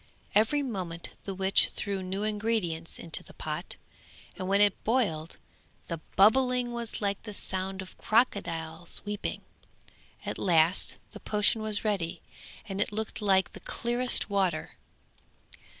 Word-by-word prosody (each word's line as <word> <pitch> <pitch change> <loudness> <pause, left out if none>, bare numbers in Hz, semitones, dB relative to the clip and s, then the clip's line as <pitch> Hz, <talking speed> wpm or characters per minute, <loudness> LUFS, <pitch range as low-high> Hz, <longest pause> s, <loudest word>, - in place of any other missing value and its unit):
Every 225 +8 +3
moment 185 -9 -4 0.2
the 195 - -4
witch 190 +1 +4
threw 200 -2 -2
new 190 +2 -3
ingredients 210 -6 -1
into 165 - 0
the - - -16
pot, - - -5 0.6
and 185 -3 -4
when 200 +1 +3
it 205 -1 +3
boiled 195 -10 0 0.5
the 170 - -3 0.2
bubbling 250 +4 +4
was 235 -2 -4
like 200 -1 0
the 210 -2 -8
sound 190 0 -3
of 185 - -14
crocodiles 170 -8 0
weeping. 205 0 -3 0.8
At - - -4
last 170 -1 +3 0.2
the - - -10
potion 210 +1 +2
was 215 0 -1
ready 180 -5 -1 0.4
and 195 0 -2
it - - 0
looked 215 +1 -4
like 190 -2 +3
the - - -9
clearest 245 +1 +2
water. 190 -6 0
200 Hz, 135 wpm, -29 LUFS, 185-220 Hz, 0.8 s, witch